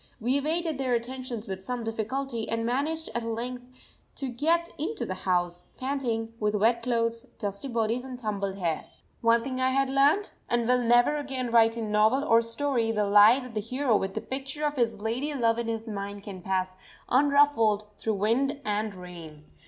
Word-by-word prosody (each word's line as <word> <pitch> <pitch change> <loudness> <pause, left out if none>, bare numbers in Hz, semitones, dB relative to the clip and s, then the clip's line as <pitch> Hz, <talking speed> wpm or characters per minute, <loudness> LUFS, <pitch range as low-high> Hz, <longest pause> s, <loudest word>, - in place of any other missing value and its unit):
We 245 +3 +1
evaded 315 +1 0
their 255 -2 +1
attentions 245 -1 -5
with 190 -1 -5
some 245 +3 -3
difficulty 225 +2 -3
and 230 0 -1
managed 300 +7 -1
at 235 - -1
length 240 +2 -4 0.5
to 270 -2 -4
get 330 +7 +1
into 405 +9 -2
the - - -3
house, 175 -2 -1
panting, 245 -4 -2
with 210 0 0
wet 230 +3 +3
clothes, 230 -1 -1
dusty 200 +3 -4
bodies, 235 0 0
and 260 -1 -7
tumbled 200 -4 -3
hair. 170 -5 -1 0.4
One 230 0 +4
thing 260 0 -3
I 260 - +3
had 270 0 +1
learnt; 285 +9 +3 0.2
and 240 -1 +1
will 250 0 +3
never 240 +5 +4
again 265 -4 -3
write 225 0 +5
in 220 -2 -3
novel 220 +6 +3
or 230 -6 +5
story 230 0 0
the 210 -2 +1
lie 210 +6 +7
that 250 -2 -9
the 215 - -1
hero 255 +2 0
with 195 -1 -1
the - - -2
picture 275 +3 -4
of 295 0 -1
his 230 -5 0
lady 255 +7 -2
love 230 -3 +2
in 235 - -2
his 225 0 -3
mind 200 -1 -5
can 195 -3 -8
pass 185 0 -1 0.3
unruffled 270 -6 +4
through 220 -1 -1
wind 255 +8 +1
and 210 0 -1
rain. 170 -4 -10
235 Hz, 185 wpm, -27 LUFS, 215-265 Hz, 0.5 s, lie